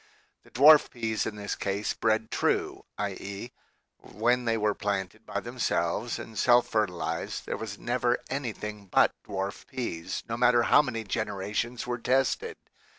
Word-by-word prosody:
The - - -20
dwarf 150 +4 +7
peas 110 -3 -2
in 110 - -4
this 100 -1 -4
case 100 +1 -2
bred 110 0 0
true, - - 0
i.e. 100 +3 -5 0.5
when 120 +4 0
they 115 -1 +2
were 105 -1 +1
planted 100 -3 -3
by - - -2
themselves - - -1
and 110 -1 -7
self 120 0 +5
fertilized 105 -6 -2
there - - -3
was 110 -3 -6
never 120 0 +1
anything 105 -6 -5
but - - +4
dwarf 100 +1 -4
peas, 85 -10 -4
no 115 - -3
matter 120 -1 +4
how - - +6
many 115 -6 -4
generations 105 +3 -2
were 120 0 -3
tested. 135 - +1
110 Hz, 150 wpm, -28 LUFS, 100-120 Hz, 0.5 s, dwarf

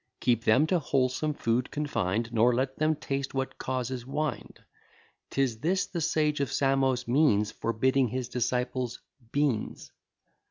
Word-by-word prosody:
Keep 115 -1 +1
them 130 +8 +5
to 175 +2 +1
wholesome 140 +1 0
food 120 0 0
confin'd, 115 -6 -2
Nor 120 +2 +4
let 130 +1 -1
them 155 +1 +2
taste 135 -1 -4
what 135 0 -3
causes 130 -1 -3
wind: 145 +4 -3 0.7
'Tis 130 -5 0
this 185 +7 +1
the 170 - -4
sage 150 -1 +1
of 140 -4 -1
Samos 135 -2 +1
means, 120 -6 +3
Forbidding 130 +4 +1
his 125 +2 -3
disciples 125 0 -2 0.3
beans. 140 -7 -1
130 Hz, 135 wpm, -28 LUFS, 120-145 Hz, 0.7 s, them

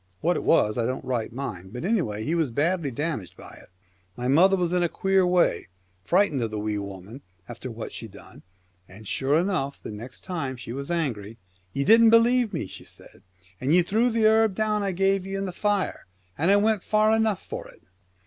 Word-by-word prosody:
What 175 +2 +2
it - - -3
was 105 -8 +3
I 115 - +1
don't 130 +1 -4
right 120 -4 -2
mind, 105 -7 -6
but 125 +6 -5
anyway 120 - -1
he 155 - -1
was 165 -5 +1
badly 155 +5 0
damaged 135 - -4
by - - -11
it. - - -18 0.5
My 125 - -3
mother 185 +8 +5
was 175 -2 0
in 180 0 +1
a 175 - +1
queer 195 0 +2
way, 180 - +2 0.3
frightened 170 - +2
of 115 - -1
the 110 - -5
Wee 105 0 -2
Woman, 100 +5 -9 0.3
after 120 +2 -8
what 115 -1 -7
she 115 - -6
done, 100 -1 -14 0.5
and 100 +3 -13
sure 140 +7 +1
enough 165 -6 -1
the - - -6
next 115 +5 -9
time 145 -8 -4
she 120 -1 -8
was 140 +3 -5
angry. 115 -11 -3 0.3
"Ye 140 - -1
didn't 225 +6 +7
believe 230 0 +4
me," 165 - -3
she - - -10
said, - - -14 0.4
"and 140 +6 +2
ye 180 - +5
threw 225 +7 +1
the 225 -1 +1
herb 220 -2 +3
I 210 -2 0
gave 195 +1 +1
ye 195 - -4
in 195 0 -2
the 185 - -4
fire, 205 0 -1 0.3
and 165 +5 +1
I 200 - +6
went 210 0 +2
far 215 +2 +3
enough 220 -3 0
for - - -7
it." - - -17
165 Hz, 210 wpm, -25 LUFS, 120-195 Hz, 0.5 s, didn't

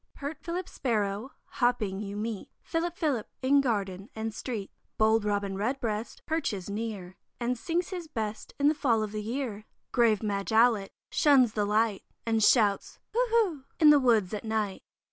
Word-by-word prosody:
Pert 285 +2 -5
Philip 355 +1 -4
Sparrow 215 0 -2
hopping 225 -6 0
you 200 -1 -5
meet, 215 -1 -4
"Philip! 345 +1 -2
Philip!" 285 -9 -1
in 280 +2 +5
garden 200 -5 -2
and 220 0 -3
street. 215 -3 -5 0.3
Bold 220 0 +4
Robin 200 -2 -1
Redbreast 220 0 -3
perches 210 - -2
near, 200 -4 -5 0.2
And 245 +1 0
sings 335 +9 -2
his 355 -4 -5
best 220 -7 -5
in 285 - +4
the 300 - +5
fall 235 -7 +1
of 210 - -4
the 215 0 -3
year. 220 -2 -4 0.2
Grave 230 -4 +3
Madge 200 0 -2
Owlet 220 -3 +4 0.2
shuns 265 -6 +5
the 210 -2 +1
light, 210 0 +1 0.2
And 225 -1 +2
shouts 210 -4 +3 0.2
"hoo! 485 +3 +3
hoo!" 405 - +2 0.2
in 305 -2 +8
the 295 - +7
woods 225 -8 +3
at 210 - -3
night. 215 -3 -2
225 Hz, 165 wpm, -29 LUFS, 210-275 Hz, 0.3 s, in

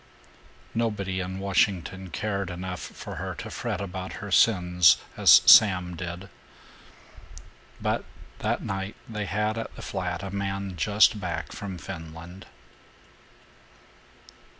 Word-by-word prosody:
Nobody 105 -5 -1
in 95 +1 -4
Washington 95 -1 0
cared 100 +1 -3
enough 90 0 -5
for - - -8
her - - -4
to - - -8
fret 120 -6 -3
about 95 -1 -5
her 105 -1 -7
sins 90 -5 +5 0.2
as - - +7
Sam 90 -5 +7
did. 85 +2 -6 1.5
But - - -1 0.4
that - - -1
night 95 +1 -4
they 105 -2 -4
had 105 +2 -1
at 115 - -7
the - - -10
flat 90 -2 -4
a 95 - -5
man 100 -1 -3
just 105 +4 +3
back 85 -4 -4
from 95 -3 -6
Finland. 85 +1 -9
95 Hz, 120 wpm, -26 LUFS, 90-100 Hz, 1.5 s, as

